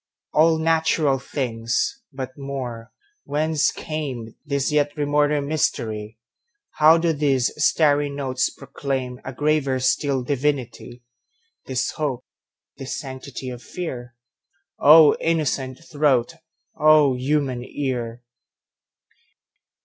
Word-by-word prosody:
All 160 +1 +4
natural 160 -3 +2
things! 120 - -2
But 130 -1 -6
more—Whence 140 - -3
cameThis 140 -1 -4
yet 145 0 +1
remoter 145 0 +1
mystery? 110 -7 -2 0.5
How 155 +2 +6
do 165 0 +1
these 140 -4 +1
starry 145 -2 +3
notes 135 -2 -1
proclaimA 130 -2 -5
graver 145 -3 +1
still 135 0 +1
divinity? 130 -3 -2 0.6
This 130 -1 -1
hope, 135 -5 -3 0.5
this 135 - -5
sanctity 130 -1 -7
of 120 -1 -8
fear?O 140 +2 +2
innocent 140 -5 -1
throat! 145 -3 +2 0.4
O 150 -3 +5
human 130 -1 -1
ear! 125 -3 -4
140 Hz, 90 wpm, -23 LUFS, 125-150 Hz, 0.6 s, How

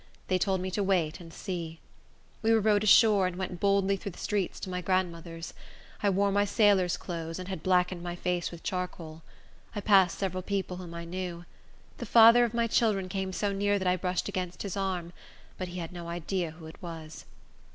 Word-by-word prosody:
They 185 -1 +2
told 190 -1 +1
me 185 0 -3
to 205 - -1
wait 180 -6 +1
and 165 -2 -11
see. 165 -3 -5 0.6
We 225 0 +2
were 225 - +5
rowed 210 -1 +3
ashore, 210 -2 +6
and 180 - -4
went 180 -1 -4
boldly 200 0 +2
through 195 0 -6
the - - -15
streets, 205 -3 -2
to - - -5
my 180 0 -2
grandmother's. 170 -2 -2 0.5
I 205 - +3
wore 200 +1 +2
my 205 +1 +3
sailor's 200 -3 +3
clothes, 165 -2 -5
and 185 -1 -6
had 190 -5 -5
blackened 180 -1 +2
my 175 0 -4
face 175 -1 -1
with 170 -1 -11
charcoal. 180 -4 -4 0.5
I 205 - -2
passed 195 -4 +4
several 185 -2 -2
people 190 -1 -3
whom 175 -2 -8
I 170 0 -6
knew. 175 0 -5 0.5
The 235 - -5
father 230 +2 +8
of 235 -1 -1
my 235 0 +2
children 210 -5 +1
came 190 0 -2
so 200 +2 -1
near 205 +1 +1
that 190 -2 -2
I 180 - +4
brushed 180 0 -2
against 180 -1 -4
his 200 -3 -4
arm; 185 -3 -2 0.5
but 185 - -3
he 180 +1 -7
had 170 -1 -5
no 175 -1 -7
idea 175 +1 -2
who 160 +1 -12
it 160 - -12
was. 165 -3 -8
185 Hz, 205 wpm, -29 LUFS, 175-200 Hz, 0.6 s, father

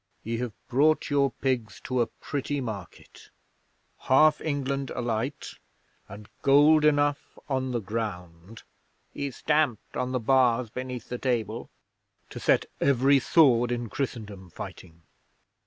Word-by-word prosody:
Ye 115 +1 -3
have 120 -2 -4
brought 150 +4 +2
your 140 -1 +3
pigs 125 -3 -2
to 130 -1 0
a 115 - +1
pretty 145 0 -4
market! 105 -9 -8 0.7
Half 150 +3 +4
England 140 -2 -2
alight, 120 +3 -3 0.6
and 105 +2 -10
gold 145 +3 +5
enough 145 -1 +1
on 130 -2 -1
the 120 - -1
ground" 95 -2 -6 0.5
he 140 0 -3
stamped 150 -3 -1
on 125 0 -2
the 130 - 0
bars 125 -1 +2
beneath 125 0 -6
the 125 - -4
table 120 -5 -2 0.6
"to - - -7
set - - +2
every 135 +1 +4
sword 125 -5 +4
in 120 -1 -3
Christendom 105 -9 -5
fighting." 85 0 -10
125 Hz, 125 wpm, -27 LUFS, 115-140 Hz, 0.7 s, gold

